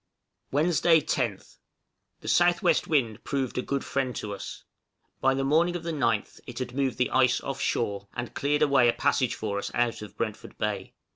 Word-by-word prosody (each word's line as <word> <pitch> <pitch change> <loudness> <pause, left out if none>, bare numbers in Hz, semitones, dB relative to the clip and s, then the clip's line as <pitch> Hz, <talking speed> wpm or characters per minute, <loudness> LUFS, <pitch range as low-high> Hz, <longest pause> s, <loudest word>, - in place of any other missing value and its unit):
Wednesday, 160 +2 +4
10th. 125 -9 -3 0.6
The - - -16
S.W. 175 -1 +4
wind 120 -8 0
proved 135 -3 -2
a - - +1
good 140 +1 -2
friend 130 -2 -1
to 105 -1 -4
us; 100 - -8 0.6
by 135 0 +3
the 135 - 0
morning 165 +5 +3
of 175 - -4
the 170 - -2
9th 115 -7 0
it 120 - -8
had 125 -2 -4
moved 135 -1 0
the 125 - +1
ice 130 -1 +4
off 135 -1 -5
shore, 100 -3 -1
and 120 -1 -4
cleared 145 +1 +1
away 135 -4 +5
a - - +3
passage 135 -3 +1
for 100 -2 -3
us - - -4
out 120 -2 0
of 105 - -10
Brentford 110 -2 -4
Bay. 100 -3 -3
130 Hz, 190 wpm, -27 LUFS, 115-145 Hz, 0.6 s, away